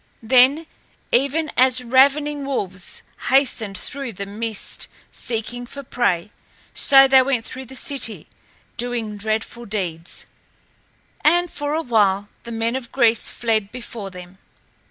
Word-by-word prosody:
Then, 260 +7 +5 0.5
even 280 +5 +1
as 255 0 +3
ravening 280 +4 +3
wolves 195 -10 -2 0.3
hasten 250 -6 +2
through 265 +4 -4
the 200 +1 -5
mist 215 +1 -3 0.2
seeking 240 +1 -3
for 280 +3 -8
prey, 205 -7 0 0.4
so 270 -1 +6
they 265 0 +7
went 255 -3 0
through 260 0 -7
the 265 +2 -11
city, 260 -4 -1 0.5
doing 235 -3 -3
dreadful 220 +3 -3
deeds. 175 -5 -2 1.0
And 345 +2 +4
for 290 +1 -2
a 325 - -1
while 205 -5 +2 0.2
the 235 - -7
men 230 +1 -1
of 255 -3 -5
Greece 230 -4 +3
fled 220 -4 -1
before 235 -4 -7
them. 180 0 -12
240 Hz, 130 wpm, -21 LUFS, 215-270 Hz, 1.0 s, they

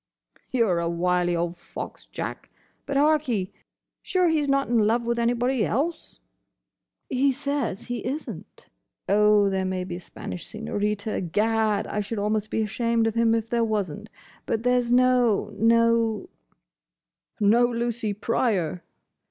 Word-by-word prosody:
"You 240 -3 +2
're 175 -3 +1
a 170 0 -1
wily 175 0 +1
old 170 +1 -1
fox, 175 - -8
Jack. - - -6 0.4
But, 280 -1 -1
hark'ee! 280 -10 +2 0.5
Sure 365 -2 +1
he's 300 -3 +1
not 275 0 +2
in 240 -1 +2
love 235 +2 +2
with 235 0 0
anybody 240 +1 +1
else?" 310 +11 -2 0.9
"He 270 +2 +2
says 280 -6 -2
he 245 -1 -4
is 275 +8 -4
n't. 205 -9 -10 0.4
Oh, 210 0 +4
there 190 -1 0
may 185 -1 -2
be 180 -1 -5
a - - -8
Spanish 180 0 -8
Senorita!—Gad! 210 0 -1
I 210 - -3
should 210 +2 -3
almost 210 +1 -1
be 220 - 0
ashamed 230 +1 0
of 225 - 0
him 230 0 +3
if 225 -1 -2
there 235 0 +1
wasn't!—But 215 +1 -4
there's 250 -1 +2
no—no—" 230 -2 +3 1.1
"No 220 +4 +5
Lucy 235 -2 -2
Pryor?" 200 -5 -1
225 Hz, 135 wpm, -25 LUFS, 205-245 Hz, 1.1 s, No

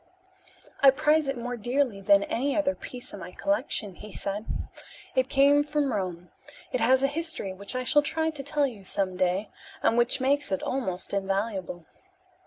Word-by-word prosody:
"I 275 - +9
prize 300 +2 +3
it 275 -1 -2
more 245 +1 -4
dearly 240 -2 0
than 200 0 +5
any 275 +7 -1
other 290 -2 +2
piece 250 -3 -7
in 205 - -7
my 185 - -7
collection," 270 -9 0
he 210 +4 -11
said. 200 +3 -2 0.7
"It 260 0 +1
came 285 +1 +5
from 295 -2 0
Rome; 180 -3 -4 0.4
it 255 - -1
has 260 +3 +4
a - - +5
history 315 - -2
which 200 +4 -8
I 255 - -1
shall 295 +4 +4
try 320 +2 0
to 300 -3 -5
tell 290 +1 +1
you 225 -7 -6
some 190 -1 0
day, 185 +3 0 0.3
and 235 - +3
which 240 0 +2
makes 280 +1 +1
it 190 - -1
almost 195 -10 -3
invaluable. 195 -3 -2
245 Hz, 180 wpm, -27 LUFS, 200-285 Hz, 0.7 s, I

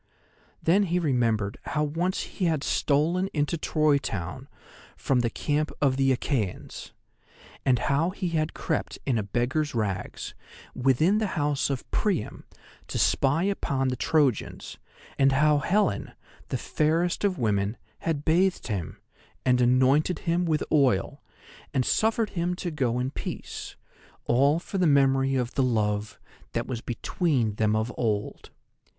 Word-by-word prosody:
Then 195 +5 +4
he 175 - +2
remembered 115 - 0
how 150 +1 -1
once 170 +6 -1
he 185 - -3
had 160 -4 +1
stolen 165 +6 +1
into 150 +2 0
Troy 155 -2 +2
town 100 +3 -5 0.5
from 130 -2 +1
the 120 -1 +1
camp 150 +6 -1
of 135 -3 +2
the 135 0 +2
Achæans, 125 - -2 0.7
and 130 -2 +3
how 145 +8 +1
he 185 -1 -3
had 155 -1 -1
crept 160 - -2
in 125 -5 +1
a - - +1
beggar's 125 +9 -1
rags 100 -5 -3 0.4
within 135 - +3
the 210 -5 -2
house 145 -2 +1
of 135 -3 -3
Priam 200 -6 -1 0.4
to - - -4
spy 140 +5 +2
upon 140 -9 0
the 125 - -1
Trojans, 140 -2 0 0.4
and 135 0 +5
how 150 +2 +4
Helen, 205 +8 0 0.3
the - - -2
fairest 165 +4 0
of 195 -3 +1
women, 105 -2 0 0.2
had 150 -3 -2
bathed 175 -3 +2
him, 95 -7 -3 0.5
and 125 -1 +3
anointed 130 +7 +3
him 170 +1 +1
with 155 -2 +1
oil, 140 -2 +2 0.5
and 130 -2 +2
suffered 220 0 +1
him 175 0 -1
to 175 -1 -4
go 125 -6 0
in 125 +2 -1
peace, - - -6 0.5
all 140 +5 +3
for 190 +3 -4
the 180 - +3
memory 135 -2 +3
of 125 -2 -1
the - - +1
love 110 -3 0 0.3
that - - -1
was 120 -3 -4
between 120 - -1
them 110 0 +2
of 110 +3 -1
old. 105 -3 -2
140 Hz, 145 wpm, -26 LUFS, 125-165 Hz, 0.7 s, and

